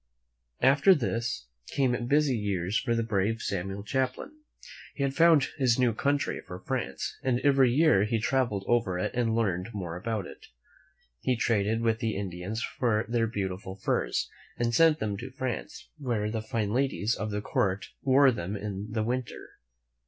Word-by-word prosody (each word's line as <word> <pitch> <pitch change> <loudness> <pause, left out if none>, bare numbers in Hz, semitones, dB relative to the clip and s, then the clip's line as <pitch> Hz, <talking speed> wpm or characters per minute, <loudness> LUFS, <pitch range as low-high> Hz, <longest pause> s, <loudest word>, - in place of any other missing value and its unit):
After 140 +8 +6
this, 115 - -2 0.2
came 125 -3 0
busy 145 -1 +3
years 100 -3 -2
for 120 0 +1
the 115 - +1
brave 110 0 0
Samuel 95 +1 -3
Champlain. 130 - -2 0.6
He 140 - -2
had 135 -1 0
found 165 -2 +5
his 125 -3 +3
new 125 -3 +3
country 140 +5 0
for 90 - -9
France, - - -3
and 125 -2 +1
every 135 -3 +4
year 145 -7 +4
he 115 +2 0
traveled 110 -4 0
over 115 -7 +1
it 90 - -2
and 115 -2 +1
learned 95 -4 0
more 90 -4 -4
about 105 +1 -3
it. - - -12 0.7
He 125 - +1
traded 110 -1 +1
with 115 -1 +1
the 115 -3 -1
Indians 100 +3 -4
for 110 -3 0
their 115 -1 +1
beautiful 95 -3 -4
furs 95 - -1 0.3
and 120 0 0
sent 160 +4 +5
them 105 -5 -2
to 125 +5 -7
France, 130 - -5
where 115 -6 -1
the 110 -1 -2
fine 110 -1 -2
ladies 125 -4 +1
of 110 -1 -3
the 105 0 -2
Court 100 -1 -1
wore 135 0 +5
them 100 -3 -4
in 100 0 -5
the 110 0 0
winter. 125 +2 -4
115 Hz, 165 wpm, -28 LUFS, 100-130 Hz, 0.7 s, After